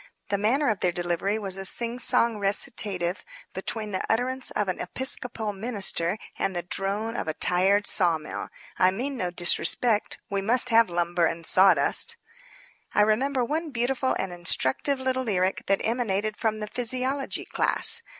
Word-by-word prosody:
The 200 - 0
manner 255 +8 +1
of 210 - -4
their 180 - +1
delivery 175 +4 -2
was 195 -3 -4
a - - -4
singsong 235 +1 +2
recitative 195 -2 -1 0.3
between 210 +3 -4
the 185 - -3
utterance 255 +3 -1
of 210 -1 -2
an 185 - -3
Episcopal 230 0 -1
minister 195 -4 -1 0.2
and 190 - -1
the 175 - -3
drone 200 +5 -3
of - - -4
a 155 - -3
tired 195 +3 +2
sawmill. 165 -5 +2 0.3
I 185 - +5
mean 255 +9 -4
no 185 -8 -3
disrespect. 205 +5 +1
We 200 0 -2
must 240 +5 +4
have 230 -3 +4
lumber 175 0 0
and 165 0 -5
sawdust. 185 -7 +4 0.8
I 210 - +5
remember 250 +4 +1
one 315 +5 -3
beautiful 260 +1 -1
and 190 -2 -4
instructive 175 - 0
little 260 0 -1
lyric 190 -6 -1
that 195 - +1
emanated 215 -3 -1
from 215 -1 -2
the 210 - -4
physiology 255 +4 -2
class. 470 - +4
210 Hz, 155 wpm, -25 LUFS, 185-245 Hz, 0.8 s, I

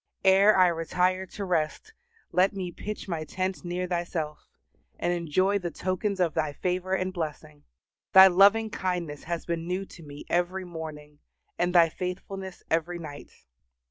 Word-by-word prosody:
Ere 195 +2 +6
I 185 - +7
retire 180 +2 0
to 200 +2 -6
rest, 175 - -1 0.4
let 185 +2 +3
me 185 -3 -4
pitch 210 +5 -6
my 165 -4 -3
tent 185 +3 -3
near 175 +1 -2
Thyself, 170 -4 -3 0.5
and 175 - 0
enjoy 185 +4 +1
the 175 -2 -3
tokens 185 +4 -2
of 170 -4 +2
Thy 155 -2 -1
favor 185 +3 -1
and 185 0 -2
blessing. 155 -3 -6 0.5
Thy 190 0 +10
loving 200 +4 +5
kindness 175 -7 -3
has 170 0 -3
been 170 -1 -3
new 185 +2 -2
to 180 - -14
me 145 -2 -10
every 180 +2 0
morning, 155 -3 -8 0.4
and 175 +1 +1
Thy 170 -1 +7
faithfulness 185 +2 -6
every 165 +2 0
night. 150 -4 -9
180 Hz, 155 wpm, -27 LUFS, 165-190 Hz, 0.5 s, Thy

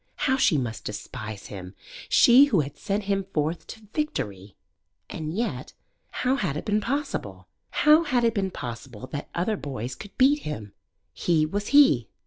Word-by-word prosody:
How 265 -2 +3
she 210 - +3
must 120 -4 -3
despise 105 0 -6
him 95 -1 -9 0.3
she 255 +4 +7
who 210 - +2
had 140 0 -6
sent 205 +1 -2
him 195 -1 -1
forth 155 +2 -1
to 220 -1 -10
victory! 105 - -3 0.6
And 155 -1 -4
yet 225 +7 -3 0.4
how 255 +2 0
'had 165 - -1
it - - -6
been 210 0 +1
possible? 205 - -3 0.2
How 305 +2 +5
had 250 -4 +1
it 230 -1 +3
been 195 -3 0
possible 120 - -7
that 145 -1 -5
other 195 +5 0
boys 130 - -5
could 205 - -11
beat 275 +3 +5
him? 110 - -6 0.4
He 160 -3 +2
was 205 +6 -3
he. 270 - +5
170 Hz, 165 wpm, -26 LUFS, -, 0.6 s, she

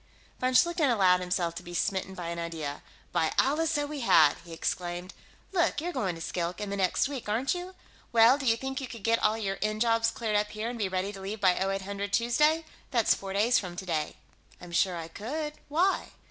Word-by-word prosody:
Von 255 0 +1
Schlichten 340 -1 +4
allowed 190 -6 +4
himself 180 -2 -1
to - - -7
be 175 0 -9
smitten 190 0 -1
by 175 -2 -5
an 170 0 -4
idea. 160 -4 -4 0.3
"By 160 - +1
Allah, 300 +5 +3
so 295 -2 0
we 295 0 -5
had!" 160 - +5
he 170 - -13
exclaimed. 175 +2 -3 0.4
"Look, 350 -5 +1
you're 350 +3 -3
going 185 - -1
to 165 - -9
Skilk, 175 +2 -3
in 205 -1 -4
the - - -1
next 190 +6 +1
week, 270 -6 -6
aren't 235 +6 +1
you? 360 +1 -6 0.4
Well, 235 +4 +6
do 270 - -3
you 225 0 +4
think 265 +2 -4
you 265 - -4
could 230 -5 -10
get 230 +1 +3
all 215 +1 +2
your 195 -3 -3
end 215 0 -1
jobs 230 -1 +3
cleared 220 -2 -2
up 210 0 0
here 215 +2 -4
and 240 -1 -6
be 200 -3 0
ready 190 +2 -2
to 195 - -9
leave 205 +3 -5
by 185 -2 +5
0800 195 +1 -2
Tuesday? 300 +9 +3 0.2
That's 235 -5 +3
four 195 -1 -6
days 220 +5 +3
from 180 -3 -6
today." 165 -5 -2 0.4
"I'm 175 -1 -11
sure 185 +1 +2
I 165 -1 -5
could. 300 - -4 0.2
Why?" 350 +6 +2
210 Hz, 220 wpm, -29 LUFS, 180-255 Hz, 0.4 s, Well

